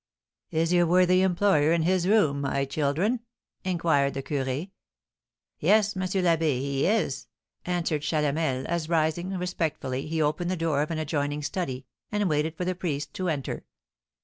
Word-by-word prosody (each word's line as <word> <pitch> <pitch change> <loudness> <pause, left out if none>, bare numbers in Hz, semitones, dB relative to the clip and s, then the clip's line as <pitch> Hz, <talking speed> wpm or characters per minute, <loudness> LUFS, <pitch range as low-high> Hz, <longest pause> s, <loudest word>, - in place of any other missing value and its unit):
"Is 165 +2 +1
your 175 -1 +4
worthy 180 +1 +4
employer 180 -5 +3
in 170 -1 +2
his 180 +1 +2
room, 160 -10 +3
my 140 0 0
children?" 155 - 0 0.4
inquired 160 -7 +1
the 135 - -3
curé. 140 +6 -2 0.9
"Yes, 215 0 +3
M. 185 - -3
l'Abbé, 170 -7 +1
he 140 +2 0
is," 205 -9 0 0.4
answered 170 -4 -1
Chalamel, 150 -3 0
as, 170 -2 -2
rising 165 +2 +1
respectfully, 160 -7 -2
he 160 +1 -2
opened 155 +3 0
the 185 - -1
door 160 -3 +1
of 150 - -1
an 165 - -2
adjoining 145 -1 -2
study, 140 -6 -3 0.3
and 210 -1 +1
waited 155 0 0
for 180 - -2
the 185 - 0
priest 150 -5 -3
to 185 -1 -2
enter. 145 -4 -3
160 Hz, 155 wpm, -27 LUFS, 145-180 Hz, 0.9 s, your